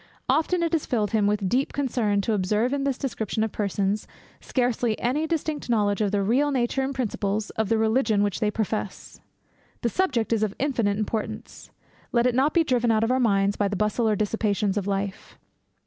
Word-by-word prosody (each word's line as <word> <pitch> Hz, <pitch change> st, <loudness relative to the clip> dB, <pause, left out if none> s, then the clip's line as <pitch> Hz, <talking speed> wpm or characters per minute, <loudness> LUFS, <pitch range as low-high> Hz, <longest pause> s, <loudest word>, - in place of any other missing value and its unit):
Often 340 Hz, +2 st, +2 dB
has 335 Hz, -, -1 dB
it 325 Hz, -, +2 dB
filled 215 Hz, -6 st, -1 dB
him 215 Hz, -3 st, +2 dB
with 205 Hz, -2 st, 0 dB
deep 255 Hz, +8 st, 0 dB
concern, 230 Hz, -7 st, 0 dB
to 220 Hz, -, -1 dB
observe 210 Hz, +6 st, +1 dB
in 280 Hz, -1 st, -1 dB
this 275 Hz, -2 st, 0 dB
description 220 Hz, -5 st, -2 dB
of 220 Hz, -, -2 dB
persons, 200 Hz, 0 st, -1 dB, 0.3 s
scarcely 245 Hz, -3 st, 0 dB
any 295 Hz, +6 st, 0 dB
distinct 310 Hz, -4 st, -2 dB
knowledge 205 Hz, -3 st, +1 dB
of 210 Hz, -, +2 dB
the 200 Hz, 0 st, 0 dB
real 260 Hz, +8 st, +2 dB
nature 260 Hz, -1 st, 0 dB
and 265 Hz, +1 st, -1 dB
principles 215 Hz, -4 st, -2 dB
of 220 Hz, -2 st, -2 dB
the 225 Hz, -, +3 dB
religion 220 Hz, -1 st, +2 dB
which 205 Hz, -2 st, -1 dB
they 215 Hz, -2 st, +1 dB
profess. 210 Hz, -2 st, -4 dB, 0.6 s
The 235 Hz, -, +2 dB
subject 245 Hz, -10 st, 0 dB
is 220 Hz, -, +1 dB
of 210 Hz, -2 st, -1 dB
infinite 235 Hz, -8 st, 0 dB
importance; 215 Hz, 0 st, -4 dB, 0.4 s
let 235 Hz, 0 st, +2 dB
it 250 Hz, -, +3 dB
not 270 Hz, +5 st, +3 dB
be 335 Hz, -, +5 dB
driven 245 Hz, -5 st, +1 dB
out 220 Hz, -1 st, +3 dB
of 225 Hz, -, +1 dB
our 260 Hz, -, +2 dB
minds 200 Hz, -4 st, +2 dB
by 205 Hz, -, +1 dB
the 200 Hz, -, -2 dB
bustle 215 Hz, +3 st, +1 dB
or 215 Hz, -, +2 dB
dissipations 210 Hz, -1 st, 0 dB
of 205 Hz, -2 st, -2 dB
life. 195 Hz, 0 st, -4 dB
220 Hz, 200 wpm, -25 LUFS, 205-255 Hz, 0.6 s, be